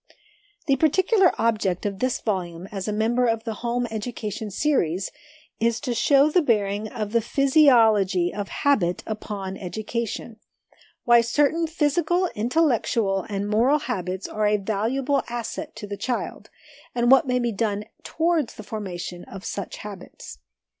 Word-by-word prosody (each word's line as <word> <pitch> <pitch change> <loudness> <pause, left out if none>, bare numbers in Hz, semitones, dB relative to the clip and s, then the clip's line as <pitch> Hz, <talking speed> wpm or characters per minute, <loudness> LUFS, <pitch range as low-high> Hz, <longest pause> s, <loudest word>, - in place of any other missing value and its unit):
The 275 -4 +2
particular 375 - +4
object 210 -6 0
of 200 -1 -3
this 255 -1 0
volume, 180 -5 -3
as 195 -1 -4
a - - 0
member 230 +4 +1
of 225 -1 0
the 225 -1 -3
'Home 240 +1 -1
Education' 215 -1 -4
Series, 195 - 0 0.5
is 230 0 +1
to 245 - -2
show 280 +4 +4
the 360 - +4
bearing 210 -5 0
of 210 -2 -4
the 230 0 +2
physiology 225 - +4
of 205 -1 -4
habit 185 -12 +1
upon 205 -3 -5
education; 220 +3 -4 0.7
why 240 -1 +6
certain 295 +7 +1
physical, 335 +3 +1
intellectual, 230 - +1
and 200 0 -2
moral 235 +8 +3
habits 190 - -4
are 215 0 0
a 210 0 +3
valuable 230 +8 0
asset 240 +6 -5
to 205 -2 -7
a - - -5
child, 250 +3 -4 0.5
and 240 0 +3
what 270 +2 +6
may 250 0 +1
be 240 -1 0
done 210 -1 -1 0.2
towards 325 -5 0
the 215 - -9
formation 180 -5 -6
of 195 0 -10
such 200 - -5
habits. 200 -4 -10
225 Hz, 145 wpm, -24 LUFS, 200-265 Hz, 0.7 s, why